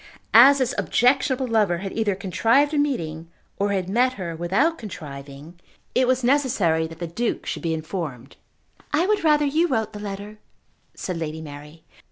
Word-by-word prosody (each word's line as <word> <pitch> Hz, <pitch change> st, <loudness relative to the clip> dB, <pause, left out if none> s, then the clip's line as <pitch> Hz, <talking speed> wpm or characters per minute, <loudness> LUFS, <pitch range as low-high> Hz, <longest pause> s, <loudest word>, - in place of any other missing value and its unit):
As 265 Hz, +5 st, +8 dB
this 260 Hz, -1 st, 0 dB
objectionable 260 Hz, +1 st, +2 dB
lover 215 Hz, -7 st, +2 dB
had 195 Hz, +2 st, -6 dB
either 215 Hz, -3 st, 0 dB
contrived 230 Hz, -, +2 dB
a 295 Hz, -, +2 dB
meeting, 165 Hz, -, -2 dB, 0.3 s
or 200 Hz, 0 st, +1 dB
had 190 Hz, -3 st, -1 dB
met 245 Hz, +6 st, +2 dB
her 175 Hz, -7 st, -5 dB
without 195 Hz, -, +1 dB
contriving, 150 Hz, -4 st, -9 dB, 0.3 s
it 255 Hz, 0 st, +2 dB
was 255 Hz, 0 st, +1 dB
necessary 235 Hz, -, +2 dB
that 165 Hz, 0 st, -11 dB
the 170 Hz, -, -4 dB
Duke 225 Hz, +8 st, -3 dB
should -, -, -4 dB
be 165 Hz, -2 st, -1 dB
informed. 155 Hz, -6 st, -6 dB, 0.6 s
"I 310 Hz, +4 st, +2 dB
would 420 Hz, -2 st, +1 dB
rather 300 Hz, -2 st, +4 dB
you 315 Hz, +5 st, +2 dB
wrote 220 Hz, -8 st, -1 dB
the 210 Hz, -, -7 dB
letter," 205 Hz, +1 st, -7 dB, 0.6 s
said 180 Hz, -3 st, -4 dB
Lady 160 Hz, -1 st, -4 dB
Mary. 150 Hz, +1 st, -11 dB
200 Hz, 170 wpm, -23 LUFS, 165-260 Hz, 0.6 s, As